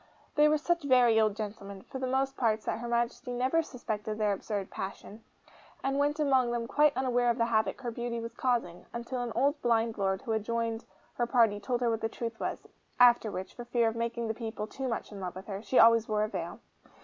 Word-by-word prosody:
They 300 Hz, 0 st, +5 dB
were 305 Hz, -, +3 dB
such 340 Hz, +3 st, 0 dB
very 245 Hz, -5 st, +5 dB
old 215 Hz, -2 st, +2 dB
gentlemen 200 Hz, -2 st, -6 dB
for 265 Hz, -, -7 dB
the 260 Hz, -, -2 dB
most 270 Hz, +1 st, 0 dB
part 220 Hz, -4 st, +1 dB
that -, -, -2 dB
Her 240 Hz, -, -5 dB
Majesty 240 Hz, +2 st, -1 dB
never 260 Hz, +7 st, +2 dB
suspected 215 Hz, -7 st, -5 dB
their 210 Hz, -2 st, +2 dB
absurd 200 Hz, 0 st, -4 dB
passion, 200 Hz, +3 st, -7 dB, 0.6 s
and 275 Hz, +1 st, 0 dB
went 290 Hz, +2 st, +1 dB
among 265 Hz, -4 st, +3 dB
them 235 Hz, -1 st, -1 dB
quite 295 Hz, +2 st, +3 dB
unaware 245 Hz, -2 st, +2 dB
of 235 Hz, -, +1 dB
the 230 Hz, -, +2 dB
havoc 225 Hz, +3 st, 0 dB
her 240 Hz, -2 st, -3 dB
beauty 235 Hz, 0 st, -3 dB
was 230 Hz, 0 st, -6 dB
causing, 240 Hz, -9 st, -1 dB
until 235 Hz, +2 st, -4 dB
an 240 Hz, -1 st, -3 dB
old 285 Hz, +4 st, +1 dB
blind 230 Hz, -2 st, +1 dB
Lord 190 Hz, -1 st, 0 dB
who 225 Hz, -, -3 dB
had 220 Hz, -1 st, +1 dB
joined 230 Hz, 0 st, -2 dB, 0.3 s
her 240 Hz, -, -1 dB
party 230 Hz, -5 st, +3 dB
told 240 Hz, +4 st, -2 dB
her 240 Hz, -, +2 dB
what 225 Hz, 0 st, -2 dB
the 225 Hz, -, -1 dB
truth 230 Hz, 0 st, -5 dB
was; -, -, -4 dB, 0.3 s
after 240 Hz, -2 st, +6 dB
which, 190 Hz, -2 st, -6 dB
for 240 Hz, -, -8 dB
fear 240 Hz, -1 st, +2 dB
of 225 Hz, -, -6 dB
making 235 Hz, 0 st, -2 dB
the 220 Hz, -, -1 dB
people 220 Hz, -2 st, -5 dB
too 265 Hz, +4 st, -5 dB
much 230 Hz, -, -3 dB
in 205 Hz, -, -8 dB
love 180 Hz, -2 st, -5 dB
with 185 Hz, -, -8 dB
her, 200 Hz, -1 st, -5 dB
she 255 Hz, -, -1 dB
always 230 Hz, 0 st, +7 dB
wore 210 Hz, 0 st, +1 dB
a -, -, 0 dB
veil. -, -, -5 dB
235 Hz, 230 wpm, -30 LUFS, 220-250 Hz, 0.6 s, always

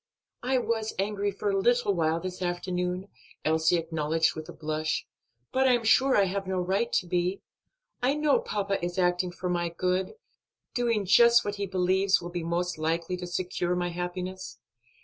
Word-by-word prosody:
"I 260 Hz, +2 st, +1 dB
was 225 Hz, -2 st, -1 dB
angry 205 Hz, +1 st, 0 dB
for 200 Hz, +1 st, -2 dB
a 195 Hz, -, +1 dB
little 240 Hz, 0 st, +2 dB
while 165 Hz, -2 st, +1 dB
this 185 Hz, +1 st, -6 dB
afternoon," 180 Hz, +1 st, -2 dB, 0.4 s
Elsie 160 Hz, +2 st, +3 dB
acknowledged 160 Hz, -1 st, 0 dB
with 155 Hz, -1 st, -7 dB
a -, -, -5 dB
blush, 155 Hz, 0 st, -2 dB, 0.5 s
"but 265 Hz, 0 st, +3 dB
I 255 Hz, -, +5 dB
am 240 Hz, -1 st, +1 dB
sure 260 Hz, +4 st, +4 dB
I 200 Hz, -, +5 dB
have 195 Hz, 0 st, -2 dB
no 190 Hz, 0 st, -1 dB
right 195 Hz, +6 st, 0 dB
to -, -, +2 dB
be; 180 Hz, +2 st, -1 dB, 0.6 s
I 260 Hz, +3 st, +2 dB
know 300 Hz, -2 st, +3 dB
papa 200 Hz, -3 st, -2 dB
is 175 Hz, +1 st, -3 dB
acting 180 Hz, 0 st, +1 dB
for 180 Hz, +1 st, -5 dB
my 175 Hz, -1 st, 0 dB
good, 180 Hz, -, -1 dB, 0.6 s
doing 230 Hz, -4 st, +1 dB
just 235 Hz, +4 st, +6 dB
what 205 Hz, 0 st, -3 dB
he 200 Hz, 0 st, -2 dB
believes 190 Hz, +1 st, +2 dB
will 175 Hz, 0 st, -7 dB
be 175 Hz, 0 st, -3 dB
most 170 Hz, +1 st, -2 dB
likely 165 Hz, +3 st, -1 dB
to 180 Hz, 0 st, -6 dB
secure 180 Hz, 0 st, -1 dB
my 175 Hz, 0 st, -1 dB
happiness. 180 Hz, +2 st, -5 dB
185 Hz, 180 wpm, -28 LUFS, 175-205 Hz, 0.6 s, just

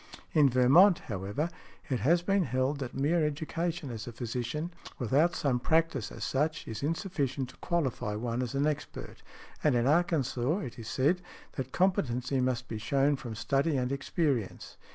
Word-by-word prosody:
In 150 Hz, -3 st, +6 dB
Vermont, 140 Hz, +10 st, +6 dB
however, 105 Hz, -, -3 dB, 0.4 s
it 130 Hz, -5 st, -1 dB
has 170 Hz, -, +3 dB
been 195 Hz, 0 st, +2 dB
held 130 Hz, +3 st, 0 dB
that 130 Hz, -3 st, -5 dB
mere 155 Hz, +5 st, +2 dB
education 160 Hz, +1 st, -2 dB
as 115 Hz, 0 st, -6 dB
a -, -, -4 dB
physician, 120 Hz, +7 st, -3 dB, 0.3 s
without 145 Hz, +8 st, +2 dB
some 135 Hz, -5 st, +1 dB
practice 160 Hz, -3 st, +1 dB
as 115 Hz, -, -7 dB
such, 150 Hz, +5 st, -1 dB
is 110 Hz, -, -5 dB
insufficient 145 Hz, -4 st, -2 dB
to -, -, -15 dB
qualify 135 Hz, -11 st, -1 dB
one 120 Hz, +2 st, -2 dB
as 125 Hz, +1 st, -3 dB
an 140 Hz, +1 st, +2 dB
expert; 150 Hz, -1 st, -4 dB, 0.4 s
and 150 Hz, -4 st, +4 dB
in 120 Hz, 0 st, +2 dB
Arkansas, 150 Hz, -2 st, +2 dB
it 125 Hz, -2 st, -7 dB
is 110 Hz, -, -8 dB
said, 155 Hz, +8 st, +1 dB, 0.3 s
that 130 Hz, -1 st, -5 dB
competency 135 Hz, -8 st, +1 dB
must 125 Hz, -1 st, -1 dB
be 110 Hz, -, -5 dB
shewn 140 Hz, +5 st, +2 dB
from 120 Hz, -4 st, -7 dB
study 135 Hz, +7 st, +1 dB
and 125 Hz, 0 st, -1 dB
experience. 140 Hz, -, -1 dB
135 Hz, 165 wpm, -30 LUFS, 125-160 Hz, 0.4 s, In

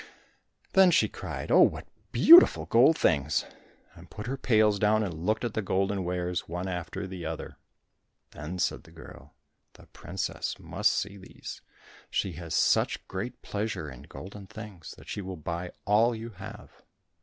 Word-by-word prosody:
Then 190 Hz, -1 st, +7 dB
she 170 Hz, -, +4 dB
cried, -, -, -6 dB
"Oh, -, -, +7 dB
what -, -, +3 dB, 0.3 s
beautiful 340 Hz, +3 st, +8 dB
gold 130 Hz, +8 st, +5 dB
things!" 75 Hz, -1 st, +1 dB, 0.5 s
and -, -, -15 dB
put 105 Hz, -, -8 dB
her 130 Hz, +3 st, -2 dB
pails 110 Hz, -5 st, +3 dB
down 110 Hz, +1 st, +3 dB
and 95 Hz, -5 st, -3 dB
looked 105 Hz, +9 st, -1 dB
at 115 Hz, -, -3 dB
the 110 Hz, -, -1 dB
golden 95 Hz, 0 st, 0 dB
wares 90 Hz, -1 st, -3 dB
one 90 Hz, +2 st, -4 dB
after 90 Hz, 0 st, -4 dB
the 95 Hz, -2 st, -7 dB
other. 80 Hz, 0 st, -6 dB, 0.7 s
Then 75 Hz, +6 st, -7 dB
said 90 Hz, -, -1 dB
the -, -, -18 dB
girl, 70 Hz, +2 st, -14 dB, 0.4 s
"The -, -, -17 dB
princess -, -, -5 dB
must -, -, 0 dB
see 100 Hz, +1 st, -3 dB
these, 95 Hz, -, -10 dB, 0.5 s
she 95 Hz, -, -1 dB
has 85 Hz, -1 st, -5 dB
such -, -, +2 dB
great 115 Hz, +6 st, -6 dB
pleasure 100 Hz, -8 st, -3 dB
in 65 Hz, 0 st, -11 dB
golden 95 Hz, +7 st, -10 dB
things, 105 Hz, -5 st, -10 dB
that -, -, -15 dB
she 105 Hz, -, -4 dB
will 95 Hz, -1 st, -6 dB
buy 85 Hz, +3 st, -4 dB, 0.2 s
all 115 Hz, +4 st, +3 dB
you 115 Hz, +1 st, -7 dB
have." 100 Hz, -, -11 dB
95 Hz, 165 wpm, -28 LUFS, 85-110 Hz, 0.7 s, beautiful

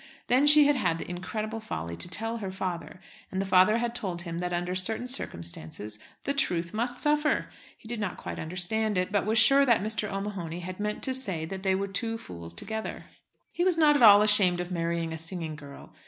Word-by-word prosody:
Then 260 Hz, +4 st, +3 dB
she 295 Hz, 0 st, +8 dB
had 290 Hz, 0 st, +3 dB
had 165 Hz, -10 st, 0 dB
the -, -, -7 dB
incredible 215 Hz, +5 st, -4 dB
folly 85 Hz, -, -5 dB
to 170 Hz, -, -2 dB
tell 225 Hz, +5 st, -2 dB
her 200 Hz, -4 st, -5 dB
father, 185 Hz, -2 st, -5 dB, 0.3 s
and 190 Hz, -, -3 dB
the 195 Hz, -, -1 dB
father 190 Hz, +3 st, +4 dB
had 235 Hz, 0 st, -2 dB
told 185 Hz, -8 st, -4 dB
him 170 Hz, -1 st, -5 dB
that 180 Hz, 0 st, -3 dB
under 175 Hz, +1 st, -2 dB
certain 220 Hz, +6 st, 0 dB
circumstances 95 Hz, -, -3 dB, 0.2 s
the 280 Hz, -, 0 dB
"truth 175 Hz, -11 st, 0 dB
must 245 Hz, +3 st, -2 dB
suffer." 300 Hz, 0 st, +1 dB, 0.3 s
He -, -, -16 dB
did 235 Hz, -1 st, -3 dB
not 205 Hz, -4 st, -3 dB
quite -, -, -7 dB
understand 185 Hz, +6 st, -1 dB
it, 185 Hz, +1 st, 0 dB
but 205 Hz, -1 st, 0 dB
was 220 Hz, +1 st, +1 dB
sure 275 Hz, +6 st, +6 dB
that 235 Hz, -7 st, +3 dB
Mr. 215 Hz, -1 st, -2 dB
O'Mahony 195 Hz, -4 st, -5 dB
had 185 Hz, +2 st, -7 dB
meant 210 Hz, 0 st, -3 dB
to 260 Hz, -, -1 dB
say 195 Hz, -12 st, 0 dB
that 190 Hz, +3 st, -6 dB
they 190 Hz, -1 st, +1 dB
were 200 Hz, +1 st, -2 dB
two 225 Hz, +3 st, -3 dB
fools 85 Hz, -, -9 dB
together. 220 Hz, -, -5 dB, 0.5 s
He 350 Hz, -, -1 dB
was 365 Hz, -2 st, +2 dB
not 300 Hz, -2 st, +5 dB
at 290 Hz, -, +1 dB
all 210 Hz, -2 st, +9 dB
ashamed 200 Hz, -4 st, +5 dB
of 180 Hz, +1 st, -4 dB
marrying 170 Hz, -1 st, -2 dB
a 160 Hz, -, -5 dB
singing 165 Hz, -1 st, -3 dB
girl. 140 Hz, -2 st, -12 dB
195 Hz, 215 wpm, -27 LUFS, 175-225 Hz, 0.5 s, all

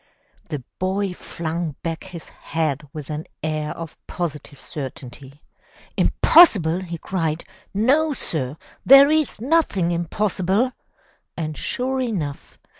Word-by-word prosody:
The 145 Hz, -4 st, -4 dB, 0.2 s
boy 190 Hz, +1 st, 0 dB
flung 165 Hz, -3 st, -4 dB
back 165 Hz, 0 st, -4 dB
his 180 Hz, -3 st, -10 dB
head 150 Hz, -3 st, -3 dB
with 150 Hz, -2 st, -7 dB
an 150 Hz, +1 st, -5 dB, 0.2 s
air 155 Hz, -1 st, -1 dB
of 165 Hz, -2 st, -8 dB
positive 150 Hz, -5 st, -5 dB
certainty. 135 Hz, -1 st, -8 dB, 0.5 s
"Impossible!" 190 Hz, -, +5 dB
he 170 Hz, -2 st, -5 dB
cried. 165 Hz, -2 st, -2 dB, 0.3 s
"No 275 Hz, +10 st, +3 dB
sir! 150 Hz, -, -1 dB, 0.3 s
There 275 Hz, +2 st, +8 dB
is 310 Hz, -7 st, +1 dB
nothing 235 Hz, -, +2 dB
impossible!" 190 Hz, +6 st, 0 dB, 0.7 s
And 155 Hz, -2 st, -3 dB
sure 260 Hz, -, -2 dB
enough! 175 Hz, -, -4 dB
170 Hz, 115 wpm, -22 LUFS, 155-210 Hz, 0.7 s, There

